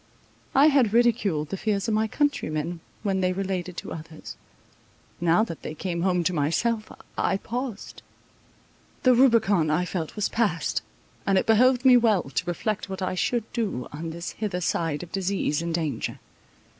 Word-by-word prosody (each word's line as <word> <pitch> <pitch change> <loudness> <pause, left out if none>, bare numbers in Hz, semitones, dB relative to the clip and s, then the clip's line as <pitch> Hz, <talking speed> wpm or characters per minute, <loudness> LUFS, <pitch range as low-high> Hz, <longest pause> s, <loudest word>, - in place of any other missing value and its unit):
I 275 +2 +7
had 260 -7 +3
ridiculed 215 -10 +2
the 195 - -3
fears 205 +1 -1
of 225 - +1
my 220 +1 +2
countrymen, 175 - -1 0.2
when 195 -2 0
they 185 0 +1
related 185 -2 -3
to - - -6
others; 155 - -9 0.8
now 175 +4 +3
that 165 -8 -6
they 155 - -6
came 170 +1 -3
home 180 -1 +2
to 185 - 0
myself, 210 +9 0 0.3
I 195 - +2
paused. 235 0 -5 1.0
The 255 - +6
Rubicon, 225 - +4
I 175 +4 +1
felt, 170 -3 -4
was 210 -2 0
passed; 205 -8 0 0.5
and 195 -1 +4
it - - +2
behoved 250 +3 +4
me 255 -1 +8
well 220 -6 +3
to 135 +6 -3
reflect 195 +4 -2
what 190 0 -4
I 185 - -1
should 235 +5 0
do 200 - -2
on 160 +3 -5
this 170 +2 -5
hither 205 -5 -3
side 165 -3 -1
of 170 - -11
disease 190 -5 -1
and 170 0 -3
danger. 155 -7 -2
190 Hz, 170 wpm, -25 LUFS, 170-225 Hz, 1.0 s, me